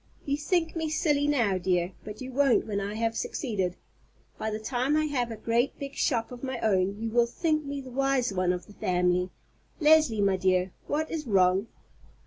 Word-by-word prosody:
You 280 - +1
think 325 +3 0
me 320 -1 -1
silly 295 -2 +1
now, 230 -10 +2
dear, 180 0 0
but 210 +2 -8
you 260 0 -6
won't 275 -2 +3
when 200 -2 -2
I 200 +2 -4
have 225 0 -1
succeeded. 195 - -2 0.6
By 220 - -1
the 215 - -2
time 250 +6 0
I 310 - +2
have 255 -5 -1
a 225 - -5
great 230 +4 0
big 275 -1 -6
shop 230 -5 0
of 245 -1 -9
my 260 -2 -3
own 195 -1 +1
you 225 0 -3
will 235 +1 +3
think 310 +4 0
me 280 0 -4
the 260 -1 -10
wise 270 -3 +1
one 185 -1 +1
of 180 0 -4
the 205 - -15
family. 180 -1 +1 0.5
Leslie, 305 -8 +5
my 195 -2 +3
dear, 185 0 +1 0.2
what 310 +2 -1
is 305 -4 -4
wrong?" 190 0 +3
235 Hz, 200 wpm, -28 LUFS, 195-280 Hz, 0.6 s, Leslie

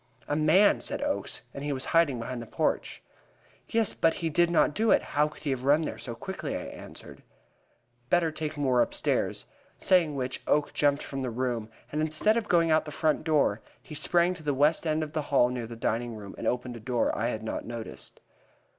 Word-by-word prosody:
"A 145 - 0
man!" 155 +7 +5
said - - -3
Oakes, 290 - -2
"and 140 - -6
he 145 - -2
was 130 -1 -3
hiding 165 -6 +4
behind 120 +1 -5
the 115 - -9
porch." - - -2 0.7
"Yes, 225 -3 +1
but 165 0 +2
he 165 -2 -2
did 170 +3 +3
not 165 -3 +3
do 220 +5 +1
it; - - +5
how 150 +1 +3
could 150 - -13
he 145 - -1
have 130 -1 -3
run 145 +4 +4
there - - -5
so 120 -2 -6
quickly?" 190 +10 -5
I - - -5
answered. - - -11 0.9
"Better 170 -2 +3
take 155 0 -4
Moore 130 -4 +3
upstairs," - - 0 0.3
saying 170 -6 +3
which, 130 -1 -3
Oakes 145 0 +2
jumped 145 0 +1
from 135 -1 -5
the 130 - -2
room, 120 -2 -2 0.2
and 150 - -1
instead 155 +8 +2
of 230 -2 -1
going 170 -2 +4
out 155 - +5
of - - -19
the 150 - -7
front 155 +1 0
door, 145 -9 +2 0.2
he 155 - -12
sprang 170 +4 +2
to 180 - -11
the 145 -2 -1
west 150 +4 +2
end 155 0 +1
of 150 -1 -7
the 155 - 0
hall 125 -3 +4
near 125 -2 -4
the 115 - -8
dining 115 +1 -2
room, 100 -2 -9
and - - -4
opened 125 0 -2
a - - -8
door 120 +1 0
I 115 - 0
had 110 -2 -3
not 110 - -4
noticed. 115 -1 -8
145 Hz, 220 wpm, -28 LUFS, 125-160 Hz, 0.9 s, man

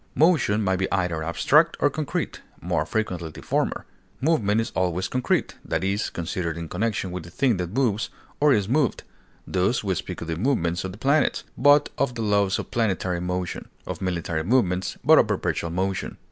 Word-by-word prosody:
Motion 145 - +3
may 95 -1 +2
be 95 +1 -2
either 90 -4 0
abstract 150 - +3
or 145 - +3
concrete, 155 -1 -3 0.2
more 85 -3 -1
frequently 90 -7 -2
the 75 - -11
former; - - -1 0.3
movement 115 -9 +2
is 115 - -2
always 90 0 0
concrete, 125 -1 0
that - - -2
is, 100 +2 0
considered 85 -1 -3
in 85 -1 -5
connection 100 -1 -1
with 90 - -4
the 85 - -11
thing 125 0 +1
that 90 +1 -4
moves 115 -5 +1 0.3
or 150 0 +5
is 105 -6 +2
moved; 135 +1 +1 0.4
thus, 95 +7 0
we 95 -2 0
speak 85 - -5
of 85 - -5
the 80 -1 -2
movements 85 -7 0
of 95 - -4
the 95 - -11
planets, 140 +5 +2
but 145 +3 +5
of 125 -3 0
the 115 - -2
laws 100 -2 +2
of - - -6
planetary 95 -6 0
motion; 90 -1 -3 0.2
of 90 -1 -5
military 85 -3 -2
movements, 95 -4 +1
but - - +8
of - - +4
perpetual 85 - -1
motion. 95 +3 -2
95 Hz, 190 wpm, -25 LUFS, 90-120 Hz, 0.4 s, but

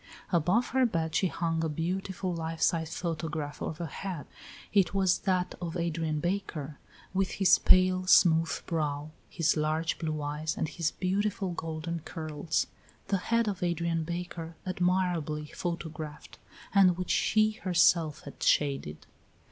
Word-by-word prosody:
Above 180 +8 +2
her 260 +2 +2
bed 165 -9 0
she 190 - +3
hung 165 -1 -1
a 160 - 0
beautiful 180 +3 -2
life 165 -1 -4
size 160 -1 +1
photograph 160 -3 -3
of 155 - -4
a 170 - -2
head. 170 0 -5 0.5
It 200 -1 +3
was 190 -2 +3
that 180 -1 +1
of 175 0 -3
Adrian 165 -2 -1
Baker, 155 -5 -3 0.3
with 190 0 0
his 195 -2 +5
pale, 185 0 +4
smooth 165 -3 +4
brow, 150 -2 -2 0.2
his 165 0 +1
large 155 +1 0
blue 155 -2 -2
eyes 150 +2 -3
and - - 0
his 165 0 -1
beautiful 195 0 -1
golden 165 0 -4
curls 155 0 -2 0.4
the 195 - +3
head 230 -1 +3
of 195 -3 -2
Adrian 170 -2 0
Baker 170 -1 -5
admirably 180 -4 0
photographed, 160 -3 -5 0.3
and 185 -3 +5
which 180 -1 -2
she 215 0 +3
herself 170 -4 +3
had 140 - -11
shaded. 135 - +1
170 Hz, 140 wpm, -29 LUFS, 155-185 Hz, 0.5 s, his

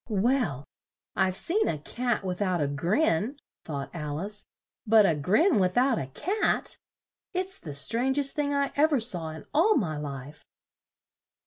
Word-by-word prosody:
"Well, 210 - +1 0.5
I've 190 -1 +1
seen 405 - 0
a 155 - 0
cat 240 +9 -2
with 185 0 -3
out 185 -3 +1
a 145 - +1
grin," 185 - 0 0.3
thought 140 -3 -5
Al 150 -3 -4
ice; 205 +3 -4 0.4
"but 215 -1 +6
a 170 - +4
grin 210 - +3
with 185 +1 +1
out 255 -1 +3
a 130 - -4
cat! 370 - 0 0.6
It's 375 +1 -1
the 150 -4 -7
strang 240 - 0
est 280 -1 +2
thing 295 -2 0
I 280 -1 0
ev 305 +2 +3
er 275 - +3
saw 180 -9 0
in 155 -1 -9
all 370 +9 +4
my 160 - -1
life!" 145 0 -7
205 Hz, 170 wpm, -27 LUFS, -, 0.6 s, but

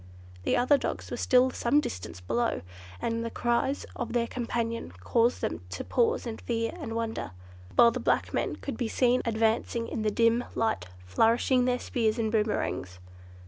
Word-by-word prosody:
The - - +2
other 265 +4 +4
dogs - - -4
were - - -3
still 255 0 +4
some 255 +5 +2
distance 90 - -5
below, 235 - 0 0.4
and 230 - -1
the 230 - -2
cries 240 +4 0
of 240 - -4
their 240 -1 +2
companion 230 - -3
caused 230 - +2
them - - -2
to - - -5
pause 470 - +1
in 225 -2 -4
fear 230 -1 -2
and 225 - -5
wonder, 230 - -3 0.4
while 235 -1 +7
the - - -3
black - - +1
men - - 0
could 275 - -6
be 240 - -1
seen 250 +2 +2
advancing 225 +1 +1
in - - -3
the 215 - +2
dim 230 +3 +3
light, 220 - 0 0.2
flourishing 235 - +3
their 250 0 +2
spears 225 -3 0
and 220 -2 0
boomerangs. 210 - -1
230 Hz, 175 wpm, -28 LUFS, 225-245 Hz, 0.4 s, while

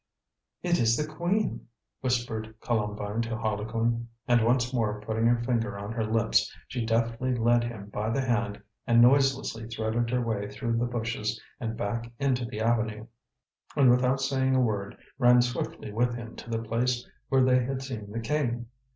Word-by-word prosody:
"It 175 -1 +2
is 115 0 +3
the 150 - 0
Queen!" 175 +6 -1 0.3
whispered 115 -4 -2
Columbine 105 -1 -1
to 115 -1 -2
Harlequin. 115 +2 -1 0.2
And 120 -2 +4
once 125 +1 +2
more 105 -4 0
putting 110 +2 0
her 120 0 +2
finger 115 -5 0
on 100 +2 -5
her 115 -1 -1
lips, 110 +1 +2 0.2
she 125 -3 -3
deftly 115 +2 0
led 120 0 +3
him 110 -4 -6
by 105 +2 -2
the 135 +4 +1
hand 120 -5 -1 0.2
and 115 0 +5
noiselessly 130 -3 +3
threaded 115 +1 -1
her 125 +1 +1
way 105 -3 -2
through 115 +3 -2
the 120 - +1
bushes 115 -2 -2 0.2
and 115 -1 -3
back 115 +3 -3
into 130 -3 +1
the 110 -2 -5
avenue, 110 -1 0 0.7
and 135 -4 +6
without 125 +2 +3
saying 130 -1 +1
a - - +4
word 105 -5 -1 0.2
ran 125 -1 +6
swiftly 120 -3 -4
with 120 +2 +1
him 115 -1 -8
to - - -9
the 115 0 -2
place 120 +2 0 0.2
where 135 -1 +4
they 130 -1 +4
had 135 +1 -3
seen 115 -6 -6
the 115 +2 -3
King. 120 -2 -1
115 Hz, 175 wpm, -28 LUFS, 110-125 Hz, 0.7 s, and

